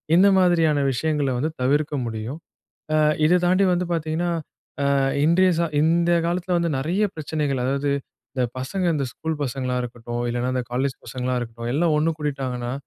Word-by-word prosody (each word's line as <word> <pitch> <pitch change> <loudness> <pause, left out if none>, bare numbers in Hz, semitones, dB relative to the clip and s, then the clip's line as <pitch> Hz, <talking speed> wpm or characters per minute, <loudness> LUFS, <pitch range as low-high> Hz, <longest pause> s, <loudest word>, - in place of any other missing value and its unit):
இந்த 190 +3 +6
மாதிரியான 165 -5 +3
விஷயங்கள 150 +1 0
வந்து 155 +5 0
தவிர்க்க 145 +3 +1
முடியும். 115 +6 -5 0.6
அ - - +4 0.3
இதை 175 +3 +5
தாண்டி 185 +2 +4
வந்து 180 +1 0
பார்த்தீங்கன்னா, 165 +2 -1 0.7
அ - - +3 0.3
இன்றைய 185 +3 +4
சா 170 - +2 0.2
இந்த 170 +2 +3 0.2
காலத்துல 175 +1 0
வந்து, 170 -1 0
நெறைய 175 +10 0
பிரச்சனைகள் 150 -4 -2
அதாவது, 140 +2 0 0.4
இந்த 130 - +1
பசங்க 180 +9 -2
இந்த 140 - -1
ஸ்கூல் 160 -2 -4
பசங்களா 130 -1 -2
இருக்கட்டும், 120 0 -5
இல்லனா 120 +1 -1
இந்த 125 - 0
காலேஜ் 130 +1 -1
பசங்களா 125 +1 -2
இருக்கட்டும், 115 0 -5
எல்லாம் 160 0 +2
ஒண்ணு 165 +2 +2
கூடிட்டாங்கன்னா, 130 -4 -3
145 Hz, 160 wpm, -23 LUFS, 125-170 Hz, 0.7 s, இந்த